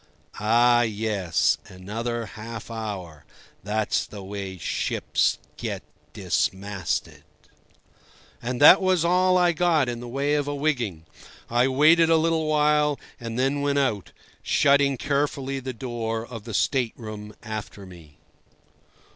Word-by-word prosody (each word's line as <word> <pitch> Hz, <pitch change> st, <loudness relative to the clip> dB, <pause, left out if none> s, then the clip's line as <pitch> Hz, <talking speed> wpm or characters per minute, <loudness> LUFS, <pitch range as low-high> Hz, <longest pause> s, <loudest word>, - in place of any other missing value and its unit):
"Ah, 120 Hz, +3 st, +4 dB
yes, 105 Hz, -7 st, 0 dB
another 115 Hz, +5 st, -4 dB
half 110 Hz, +1 st, -8 dB
hour. 100 Hz, -9 st, -6 dB, 0.4 s
That's 105 Hz, +1 st, 0 dB
the 100 Hz, -2 st, -9 dB
way 95 Hz, -1 st, -6 dB
ships -, -, 0 dB, 0.2 s
get -, -, -4 dB, 0.3 s
dismasted." 95 Hz, -2 st, -2 dB, 1.2 s
And 125 Hz, +1 st, -3 dB
that 150 Hz, +7 st, +9 dB
was 185 Hz, -3 st, +2 dB
all 185 Hz, +1 st, +3 dB
I 175 Hz, -1 st, +4 dB
got 165 Hz, -4 st, +2 dB
in 120 Hz, -1 st, -3 dB
the 120 Hz, -, -8 dB
way 140 Hz, +4 st, -1 dB
of 145 Hz, -1 st, 0 dB
a 145 Hz, -, -2 dB
wigging. 120 Hz, -, -1 dB, 0.5 s
I 120 Hz, +2 st, +3 dB
waited 155 Hz, +5 st, +5 dB
a 165 Hz, -, +5 dB
little 160 Hz, -1 st, +1 dB
while 150 Hz, -1 st, +2 dB, 0.2 s
and 115 Hz, -1 st, -5 dB
then 135 Hz, +3 st, +1 dB
went 140 Hz, 0 st, 0 dB
out, 115 Hz, -9 st, 0 dB, 0.3 s
shutting 140 Hz, -1 st, +3 dB
carefully 140 Hz, 0 st, -1 dB
the 130 Hz, 0 st, -5 dB
door 115 Hz, -2 st, -4 dB
of 115 Hz, -3 st, -9 dB
the 115 Hz, -3 st, -5 dB
state 125 Hz, -1 st, +1 dB
room 105 Hz, -2 st, -8 dB
after 110 Hz, -2 st, -7 dB
me. 85 Hz, -5 st, -15 dB
120 Hz, 130 wpm, -25 LUFS, 105-145 Hz, 1.2 s, that